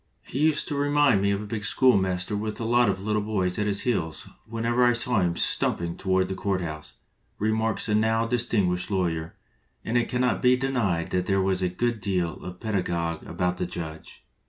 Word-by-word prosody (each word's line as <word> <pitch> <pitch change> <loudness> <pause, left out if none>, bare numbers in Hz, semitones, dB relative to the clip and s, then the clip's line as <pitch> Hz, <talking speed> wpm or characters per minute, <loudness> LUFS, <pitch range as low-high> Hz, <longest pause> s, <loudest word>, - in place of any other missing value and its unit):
"He 130 - -5
used 155 0 +2
to - - -3
remind 145 -6 +3
me 100 - +2
of 100 +1 0
a - - -7
big 105 0 -4
schoolmaster 95 -5 +2
with 105 +1 -3
a - - -3
lot 120 0 +3
of 95 0 -2
little 105 0 0
boys 95 -4 -1
at 105 - 0
his 100 -1 0
heels 80 -10 -2 0.2
whenever 115 +2 0
I 120 0 +5
saw 120 -1 +1
him 85 -2 +1
stumping 85 0 0
toward 95 -1 +1
the 95 - -3
court 95 0 -1
house," 80 -3 -6 0.4
remarks 110 +1 0
a 105 - 0
now 110 +1 +2
distinguished 110 -7 0
lawyer, 85 -5 -1 0.5
and 120 +2 +2
it 115 - -2
cannot 125 -3 +1
be 125 0 +5
denied 120 -11 -1
that 90 0 0
there 95 -1 +2
was 95 -1 0
a 90 - +1
good 120 +5 -1
deal 90 -4 -1
of - - -16
the 90 - -6
pedagogue 85 -5 -2
about 90 0 -1
the 90 - -2
judge. 80 -2 -7
100 Hz, 205 wpm, -26 LUFS, 90-115 Hz, 0.5 s, I